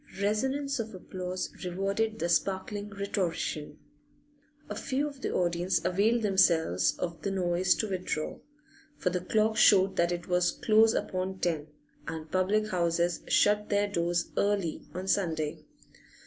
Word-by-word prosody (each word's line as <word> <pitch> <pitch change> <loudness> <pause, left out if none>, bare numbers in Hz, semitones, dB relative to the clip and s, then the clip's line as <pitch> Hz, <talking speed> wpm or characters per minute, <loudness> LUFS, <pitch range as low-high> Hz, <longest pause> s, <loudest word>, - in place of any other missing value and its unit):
Resonance 265 +7 0
of 220 -2 -4
applause 185 0 -5
rewarded 195 +5 -1
the 170 - -1
sparkling 195 +4 -1
rhetorician. 180 -7 -3 0.9
A - - -5
few 280 +2 -1
of 280 -2 -10
the - - -2
audience 175 +1 +1
availed 220 +6 +2
themselves 165 - +3
of 170 -2 -4
the 200 - -2
noise 180 -1 +2
to 220 - -2
withdraw, 180 -5 -3 0.6
for 180 - 0
the 180 0 -1
clock 220 +3 +1
showed 195 -1 +5
that 170 0 +2
it 175 -1 -4
was 180 0 +2
close 220 +1 +4
upon 185 0 -2
ten, 160 -5 -1 0.4
and 160 -1 -6
public 205 +3 +1
houses 170 -1 0
shut 210 0 +3
their 205 0 +2
doors 175 -3 -1
early 200 -5 0
on 185 +1 -4
Sunday. 160 -6 0
185 Hz, 140 wpm, -29 LUFS, 175-210 Hz, 0.9 s, showed